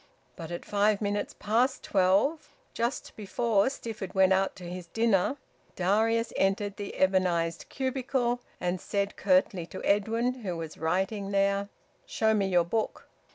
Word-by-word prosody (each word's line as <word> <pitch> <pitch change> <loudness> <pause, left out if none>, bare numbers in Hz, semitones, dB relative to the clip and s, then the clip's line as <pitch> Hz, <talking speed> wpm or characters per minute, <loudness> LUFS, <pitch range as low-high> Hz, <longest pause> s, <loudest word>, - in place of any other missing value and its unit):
But 165 -3 -8
at 175 0 -6
five 205 0 +2
minutes 205 -1 -2
past 240 +6 +1
twelve 200 - +2 0.2
just 235 +3 -2
before 215 +1 +1
Stifford 220 -8 -6
went 190 0 +5
out 190 +1 +1
to 185 - -11
his 175 0 -7
dinner 225 +4 +1 0.4
Darius 225 +5 +1
entered 200 +1 0
the 200 -1 -6
ebonised 180 -3 +1
cubicle, 260 -2 -1 0.2
and 180 0 -2
said 200 -1 -2
curtly 185 -2 +2
to 190 - -8
Edwin, 230 +5 +1
who 180 -5 -3
was 160 -1 -6
writing 190 +5 -1
there 200 0 +1 0.4
"Show 220 0 +2
me 200 -2 +1
your 175 -2 +3
book." 220 +5 -2
200 Hz, 145 wpm, -28 LUFS, 185-225 Hz, 0.4 s, went